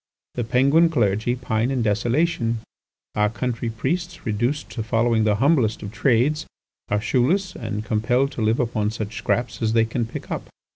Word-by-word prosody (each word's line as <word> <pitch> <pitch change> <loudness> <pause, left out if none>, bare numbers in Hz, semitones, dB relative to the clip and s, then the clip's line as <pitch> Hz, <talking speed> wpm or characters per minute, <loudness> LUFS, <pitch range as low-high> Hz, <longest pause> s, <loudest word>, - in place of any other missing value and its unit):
The 120 - -2
Penguin 140 +8 +4
clergy 110 -4 +1
pine 120 -1 -1
in 130 -3 0
desolation; 115 +2 +1 0.5
our 105 0 +2
country 120 0 -3
priests, 170 +11 -3
reduced 120 +7 -1
to 115 - -4
following 115 0 +2
the 105 -1 +3
humblest 125 -3 +2
of 100 - -6
trades, 135 +6 +1 0.4
are 105 - +1
shoeless, 170 - +1
and 105 +1 -4
compelled 120 +5 +1
to - - -5
live 110 +2 +2
upon 110 -3 0
such 110 0 -5
scraps 120 +3 -1
as 110 -1 +1
they 115 -1 +4
can 115 0 -2
pick - - -8
up. - - -4
115 Hz, 165 wpm, -23 LUFS, 110-130 Hz, 0.5 s, Penguin